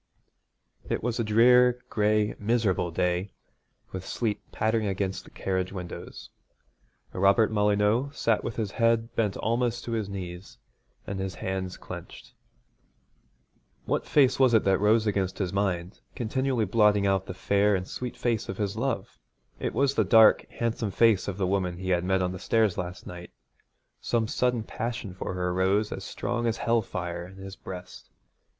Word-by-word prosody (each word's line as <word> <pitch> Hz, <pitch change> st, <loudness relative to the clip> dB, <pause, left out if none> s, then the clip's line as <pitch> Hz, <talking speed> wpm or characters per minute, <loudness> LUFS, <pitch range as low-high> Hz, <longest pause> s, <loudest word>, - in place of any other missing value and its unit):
It -, -, -1 dB
was 120 Hz, 0 st, -1 dB
a -, -, +2 dB
drear, 125 Hz, +3 st, +5 dB
gray, 105 Hz, -1 st, +2 dB
miserable 105 Hz, -5 st, +1 dB
day, 90 Hz, +3 st, -1 dB, 0.6 s
with 95 Hz, -1 st, -5 dB
sleet 110 Hz, +1 st, -2 dB
pattering 110 Hz, 0 st, 0 dB
against 95 Hz, -1 st, -2 dB
the -, -, -14 dB
carriage 95 Hz, -1 st, -2 dB
windows. 90 Hz, -3 st, -8 dB, 0.8 s
Robert 100 Hz, +4 st, +4 dB
Molyneux 105 Hz, +4 st, +2 dB
sat 115 Hz, -5 st, 0 dB
with 115 Hz, -, -4 dB
his 105 Hz, -4 st, -2 dB
head 115 Hz, 0 st, +1 dB
bent 105 Hz, -4 st, 0 dB
almost 120 Hz, +1 st, 0 dB
to 120 Hz, -, -5 dB
his 110 Hz, -3 st, -2 dB
knees, 90 Hz, -1 st, -7 dB, 0.5 s
and 100 Hz, -1 st, -4 dB
his 95 Hz, -1 st, -3 dB
hands 95 Hz, -1 st, -4 dB
clenched. -, -, -10 dB, 1.5 s
What -, -, -1 dB
face 135 Hz, -3 st, +4 dB
was 130 Hz, -3 st, +5 dB
it 110 Hz, -, +3 dB
rose 105 Hz, +4 st, +3 dB
against 95 Hz, -3 st, -1 dB
his 95 Hz, -3 st, -2 dB
mind, 95 Hz, -2 st, -1 dB, 0.2 s
continually 130 Hz, -1 st, 0 dB
blotting 105 Hz, 0 st, +3 dB
out 95 Hz, -1 st, +1 dB
the 90 Hz, -, -6 dB
fair 100 Hz, +1 st, +2 dB
and 90 Hz, 0 st, -3 dB
sweet 125 Hz, -1 st, -6 dB
face 115 Hz, -4 st, -1 dB
of 95 Hz, -, -4 dB
his 100 Hz, -1 st, -2 dB
love? 115 Hz, -4 st, -3 dB, 0.4 s
It -, -, -3 dB
was 140 Hz, 0 st, +2 dB
the -, -, +2 dB
dark, 110 Hz, -2 st, +6 dB
handsome 115 Hz, -2 st, -2 dB
face 110 Hz, 0 st, +3 dB
of 100 Hz, -2 st, -3 dB
the 95 Hz, -, 0 dB
woman 90 Hz, -2 st, -1 dB
he 95 Hz, +1 st, -5 dB
had 90 Hz, -1 st, +2 dB
met 95 Hz, 0 st, +1 dB
on 90 Hz, -, -1 dB
the 90 Hz, -, -7 dB
stairs 110 Hz, -3 st, +2 dB
last 90 Hz, 0 st, -5 dB
night. 90 Hz, 0 st, -9 dB, 0.7 s
Some 115 Hz, -2 st, 0 dB
sudden 125 Hz, 0 st, 0 dB
passion 115 Hz, -3 st, -4 dB
for 95 Hz, 0 st, -5 dB
her 90 Hz, -1 st, -1 dB
rose 95 Hz, +3 st, +1 dB
as 95 Hz, -, -5 dB
strong 120 Hz, +3 st, -2 dB
as 115 Hz, -, 0 dB
hell 115 Hz, -1 st, +2 dB
fire 85 Hz, -3 st, -5 dB
in 95 Hz, -, -14 dB
his 95 Hz, 0 st, -9 dB
breast. 90 Hz, -2 st, -10 dB
105 Hz, 165 wpm, -27 LUFS, 95-115 Hz, 1.5 s, dark